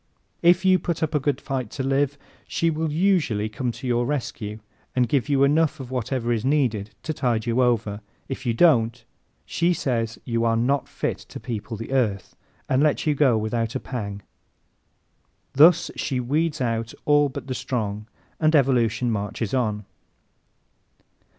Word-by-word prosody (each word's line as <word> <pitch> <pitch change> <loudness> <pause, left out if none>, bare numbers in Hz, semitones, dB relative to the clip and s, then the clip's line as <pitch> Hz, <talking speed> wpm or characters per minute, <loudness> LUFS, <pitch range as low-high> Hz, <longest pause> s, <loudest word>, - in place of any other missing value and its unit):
If 175 +2 +4
you 185 -1 +5
put 170 -2 -2
up 155 - -1
a 150 - +3
good 140 -1 0
fight 130 -5 -3
to 135 - -1
live 140 +1 +1 0.3
she 165 0 +1
will 160 0 -2
usually 155 - +1
come 120 +3 -2
to 120 +4 -9
your 120 -1 +1
rescue 115 -7 -3 0.4
and 125 -1 +3
give 140 +2 0
you 140 -1 +3
enough 155 +2 +2
of 130 -2 -8
whatever 125 -1 -1
is 115 -2 -2
needed 125 -7 +1
to 155 - -2
tide 120 -6 0
you 120 +2 +1
over. 110 -4 +1 0.3
If 135 - -5
you 120 -2 0
don't, 120 -7 +3 0.4
she 170 +1 +1
says 115 -5 -1
you 115 -1 0
are 115 -1 +2
not 135 +5 +1
fit - - -3
to - - -10
people 115 -2 -5
the 115 +4 -7
earth 110 -8 0 0.3
and 130 +1 +2
lets 150 -1 +2
you 150 - +3
go 135 -5 +3
without 115 +2 -2
a - - 0
pang. 100 -7 -5 1.3
Thus 165 +4 +6
she 130 -3 -2
weeds 150 +6 0
out 115 -2 -2
all 145 -1 +4
but 135 -1 -7
the 130 - -3
strong 110 -5 -3 0.3
and 155 0 +3
evolution 120 -4 +2
marches 105 0 -3
on. 105 -5 0
125 Hz, 170 wpm, -24 LUFS, 115-145 Hz, 1.3 s, Thus